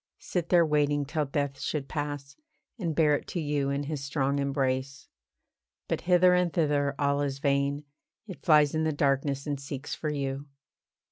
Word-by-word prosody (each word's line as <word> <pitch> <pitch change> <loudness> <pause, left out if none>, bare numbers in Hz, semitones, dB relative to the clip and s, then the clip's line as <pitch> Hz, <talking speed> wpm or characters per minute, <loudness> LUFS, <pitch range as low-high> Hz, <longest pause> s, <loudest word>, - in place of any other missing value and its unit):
Sit 175 -2 -3
there 175 -2 +5
waiting 145 -1 +1
till 150 +1 -1
death 140 -1 -2
should 145 -3 -3
pass, 145 -2 -4 0.4
And 165 -6 -2
bear 150 -2 +4
it - - -5
to 175 - -3
you 145 -3 0
in 140 +1 -1
his 145 -1 -4
strong 140 0 0
embrace. 135 -1 -1 0.8
But - - -1
hither 180 0 +6
and 180 -1 +2
thither 145 -4 +1
all 140 0 +1
is 140 -1 -2
vain, 140 +1 0 0.4
It 190 -5 -9
flies 150 -3 +5
in 160 0 0
the 160 -1 +1
darkness, 140 -1 0
and 145 -2 -2
seeks 140 0 -6
for 155 - -3
you. 140 0 -3
145 Hz, 175 wpm, -28 LUFS, 140-155 Hz, 0.8 s, hither